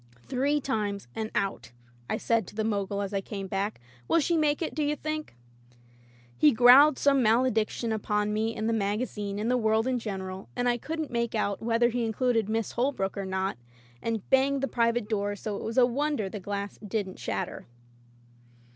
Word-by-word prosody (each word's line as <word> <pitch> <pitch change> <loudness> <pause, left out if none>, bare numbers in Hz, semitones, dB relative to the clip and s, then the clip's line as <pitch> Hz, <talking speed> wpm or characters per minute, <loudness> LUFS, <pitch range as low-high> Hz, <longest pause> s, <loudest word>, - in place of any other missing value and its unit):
"Three 275 +3 +1
times, 210 - -2
and 220 -1 -3
out,'* 120 - -2 0.4
I - - 0
said 230 -5 +1
to - - -12
the 220 - 0
Mogul 200 -2 -1
as 200 +1 -5
I 195 - 0
came 195 0 -6
back. 195 +2 -2 0.3
"Will - - +4
she 335 +3 +1
make 305 0 +2
it, - - -3
do 310 - -2
you 295 +1 +1
think?" 310 - -5 1.0
He 150 +5 +5
growled 255 +5 +7
some 275 -2 +3
malediction 225 0 +2
upon 210 -1 0
me 220 +1 -1
and 220 - -2
the 230 - +1
magazine 205 -1 -2
and 220 +4 0
the 250 - +3
world 220 -1 +2
in 255 -1 0
general 190 -3 -6
— - - -30
I 245 0 +1
couldn't 315 +2 -4
make 235 -1 -1
out 200 -2 -1
whether 235 +1 +2
he 240 0 -1
included 225 -1 +1
Miss 225 -1 -1
Holbrook 240 -6 -1
or 200 -1 -3
not 190 -6 -2 0.2
— 120 0 -28
and 225 -3 -3
banged 270 +1 +3
the - - +2
"Private" 230 -3 +1
door 205 -2 -1
so 205 0 -4
ijt - - -6
was 225 +2 -4
a 250 - +7
wonder 265 -4 -1
the 210 - -6
glass 200 +1 -5
didn't 205 -2 -4
shatter. - - -4
225 Hz, 195 wpm, -28 LUFS, 200-250 Hz, 1.0 s, growled